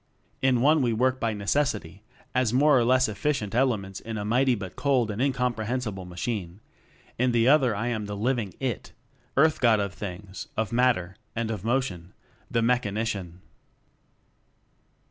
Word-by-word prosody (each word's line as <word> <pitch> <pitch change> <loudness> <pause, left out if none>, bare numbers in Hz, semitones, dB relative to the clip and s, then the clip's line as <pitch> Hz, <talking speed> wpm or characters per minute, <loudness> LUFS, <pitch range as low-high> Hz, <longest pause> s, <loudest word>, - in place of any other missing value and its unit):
In 130 -2 +3
one 150 +3 +4
we 120 -3 +1
work 130 +3 +1
by 115 -2 0
necessity 105 - -1 0.3
as 125 -3 +2
more 145 +4 +5
or 125 - +4
less 130 +2 +4
efficient 110 -1 -2
"elements" 110 -7 0
in 110 -1 -6
a 105 - -3
mighty 125 +3 +3
but 95 -4 -7
cold 130 -6 +1
and 105 +3 -4
incomprehensible 125 -6 -1
machine; 90 0 -4 0.6
in 125 0 +2
the 115 0 +3
other 135 -6 +4
I 115 +4 -1
am 110 -3 -3
the 105 0 -5
living 115 -3 -1
IT 130 -5 -3 0.4
Earth 155 +2 +4
God 115 -4 +5
of 100 -1 -2
things, 100 +1 -7
of 110 0 -1
matter, 115 -7 +1 0.2
and 115 -1 -1
of 105 -4 -5
motion 110 -8 -2 0.4
the 115 - +1
Mechanician. 105 -6 -1
115 Hz, 155 wpm, -26 LUFS, 100-130 Hz, 0.6 s, more